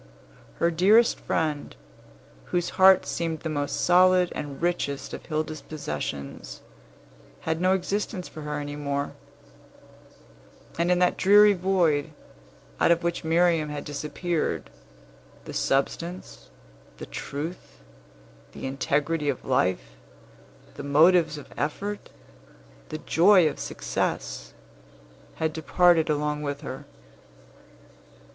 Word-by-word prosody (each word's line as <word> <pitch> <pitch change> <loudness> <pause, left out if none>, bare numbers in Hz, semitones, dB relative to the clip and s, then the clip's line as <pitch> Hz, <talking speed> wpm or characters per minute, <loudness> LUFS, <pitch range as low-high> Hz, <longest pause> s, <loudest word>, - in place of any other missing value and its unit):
Her 170 - +1
dearest 205 +8 +4
friend, 150 -2 -2 0.7
whose 175 0 -1
heart 190 0 +6
seemed 165 -2 -3
the 160 - -4
most 145 -2 -2
solid 180 0 +4
and 145 -2 -6
richest 170 -5 -2
of - - -8
Hilda's 155 -1 -3
possessions, 75 - -6 0.8
had 160 +1 -2
no 185 +1 +4
existence 190 0 -3
for 155 - -10
her 150 0 -4
any 145 0 -5
more; 140 -1 -3 1.7
and 170 +1 +2
in 180 - +4
that 180 0 +2
dreary 205 +1 +6
void, 175 -6 +1 0.7
out - - +4
of 170 0 +3
which 170 0 -2
Miriam 165 -1 +2
had 150 -1 -5
disappeared, 150 +3 -3 0.7
the - - -8
substance, 170 +6 -2 0.5
the - - -7
truth, 155 +6 -7 0.8
the - - -7
integrity 145 +3 -1
of 135 - -3
life, 95 -8 0 0.8
the - - -8
motives 160 +2 +4
of 145 - -11
effort, 200 +10 -4 0.8
the 155 - -4
joy 175 +2 +5
of 150 - -4
success, - - -3 0.8
had 160 -1 -1
departed 165 +1 +3
along 150 0 -1
with 145 -1 -4
her. 135 0 -7
160 Hz, 110 wpm, -26 LUFS, 145-180 Hz, 1.7 s, heart